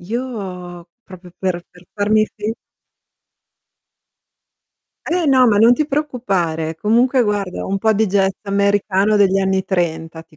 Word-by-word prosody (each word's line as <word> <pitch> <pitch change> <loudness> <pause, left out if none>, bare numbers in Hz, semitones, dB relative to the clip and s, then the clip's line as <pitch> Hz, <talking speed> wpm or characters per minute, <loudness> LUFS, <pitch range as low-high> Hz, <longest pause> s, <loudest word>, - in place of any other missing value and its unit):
Io 185 -5 -6 0.2
proprio 180 -2 -14
per 180 -2 -2
per 180 -1 -19
farmi 215 +1 +2
fi 215 +1 -3 2.6
Eh, 350 0 0
no, 260 -3 +4
ma 210 -3 +3
non 230 +3 +6
ti 300 +4 0
preoccupare. 195 - -2
Comunque 240 - +2
guarda, 205 -4 -2
un 195 +1 -2
po' 220 +2 +2
di 215 +1 +1
jazz 195 0 +1
americano 200 0 +1
degli 195 -2 +3
anni 190 -1 0
30 165 -3 -3
ti 155 - -24
200 Hz, 135 wpm, -18 LUFS, 180-220 Hz, 2.6 s, non